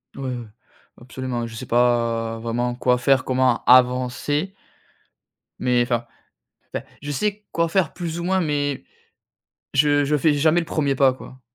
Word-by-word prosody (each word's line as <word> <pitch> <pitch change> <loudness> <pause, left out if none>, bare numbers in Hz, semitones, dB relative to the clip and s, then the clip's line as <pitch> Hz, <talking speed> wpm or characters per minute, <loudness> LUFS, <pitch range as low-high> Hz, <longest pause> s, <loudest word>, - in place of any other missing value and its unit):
Ouais, 135 - -8
ouais, 120 -2 -7 0.5
absolument, 125 -1 -4
je 115 - -10
sais - - -6
pas 115 -2 +1
vraiment 120 +1 -2
quoi 125 0 +2
faire, 130 +1 +2
comment 130 -2 +1
avancer. 130 +7 +3 1.1
Mais, 125 -1 +2
enfin 120 -1 -1 0.7
enfin, - - -4 0.2
je 145 0 -5
sais 210 +7 -2
quoi 170 0 +1
faire 185 -2 +1
plus 170 -1 -5
ou - - -4
moins, 190 +1 +1
mais 145 - -1 0.9
je 145 0 +3
je 150 +1 +1
fais 150 +1 +3
jamais 155 +4 +3
le - - -6
1er 145 -4 0
pas, 130 -1 +4
quoi. 130 0 -13
130 Hz, 155 wpm, -22 LUFS, 120-150 Hz, 1.1 s, pas